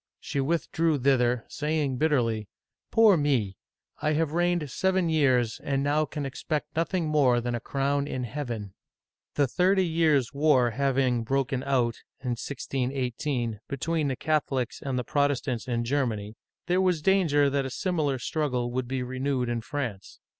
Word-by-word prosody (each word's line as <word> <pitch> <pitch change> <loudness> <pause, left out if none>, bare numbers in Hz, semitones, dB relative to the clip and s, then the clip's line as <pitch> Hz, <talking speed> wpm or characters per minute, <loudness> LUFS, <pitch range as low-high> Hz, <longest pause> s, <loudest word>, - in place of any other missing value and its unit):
She 140 - -3
withdrew 160 +1 +1
thither, 125 -3 +2
saying 150 -3 -1
bitterly, 120 -8 +1 0.4
Poor 225 -3 +6
me! 130 - +1 0.5
I 150 +1 +1
have 155 -1 0
reigned 175 -3 0
seven 190 -2 +1
years, 130 -7 +2
and 140 -1 0
now 150 +2 +2
can 150 -1 -5
expect 150 +2 -4
nothing 165 +1 0
more 140 -6 +3
than 120 0 -3
a 120 - -1
crown 140 +3 -1
in 130 -3 -3
Heaven! 120 -6 -5 0.3
" - - -64
The 145 - +3
Thirty 185 +7 +2
Years' 155 -6 +2
War 140 -4 +3
having 130 -1 +1
broken 135 +1 0
out 125 -4 0 0.2
(161 125 +1 -3
8) 125 -3 -2
between 155 +3 -1
the 135 - -1
Catholics 135 -4 -1
and 135 -2 -2
the 125 - -1
Protestants 140 -3 0
in 120 -1 0
Germany, 115 -6 -1 0.3
there 180 +1 +2
was 180 -5 +1
danger 160 -7 +3
that 140 -1 0
a - - -5
similar 150 -2 -1
struggle 125 -2 -1
would 125 0 -2
be 130 0 -2
renewed 130 0 -1
in 120 -1 -1
France. 120 -6 -5
140 Hz, 155 wpm, -27 LUFS, 125-155 Hz, 0.5 s, Poor